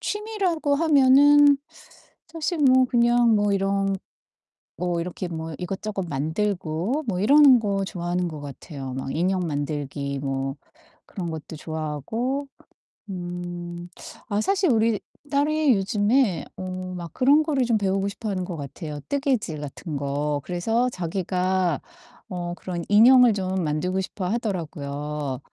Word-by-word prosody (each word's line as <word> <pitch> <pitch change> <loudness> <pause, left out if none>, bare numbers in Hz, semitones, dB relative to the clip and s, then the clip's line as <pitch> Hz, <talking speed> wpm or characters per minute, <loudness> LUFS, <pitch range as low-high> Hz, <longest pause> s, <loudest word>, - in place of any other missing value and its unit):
취미라고 395 -9 -1
하면은 290 -1 +6 0.7
사실 330 +1 -3
뭐 260 -3 +5
그냥 240 -1 +4
뭐 205 -1 +2
이런 195 0 +1 0.8
뭐 175 -1 -1
이렇게 180 +1 -4
뭐 160 -1 -5
이것저것 195 +2 -4
만들고 175 - -1
뭐 185 -4 -1
이러는 275 +3 +7
거 200 -2 -1
좋아하는 175 -1 -2
것 155 -2 -7
같아요. 140 -1 -8
막 135 0 -4
인형 180 +1 +1
만들기 145 -2 -3
뭐 135 0 -3 0.5
그런 175 -4 -5
것도 160 0 -7
좋아하고 160 - -3 0.6
음 175 -1 -5 0.8
아 205 0 +1
사실 380 - +2
우리 225 -2 +2 0.3
딸이 295 -1 +3
요즘에 205 - +1
어 185 0 -5 0.2
막 170 -2 -7
그런 285 +4 +4
거를 285 -4 +1
좀 230 -2 +2
배우고 195 -1 0
싶어 215 +2 -6
하는 185 -2 -2
것 175 -3 -6
같아요 150 +1 -6
뜨개질 260 - 0
같은 150 +1 -6
거. 145 +1 -1
그래서 225 +8 0
자기가 185 -2 -1 0.5
어 175 -2 -4
그런 175 -1 -5
인형을 240 +3 +7
좀 190 -2 -2
만들고 175 +5 -1
싶어 185 0 -5
하더라고요 150 - -3
190 Hz, 265 characters per minute, -24 LUFS, 160-240 Hz, 0.8 s, 이러는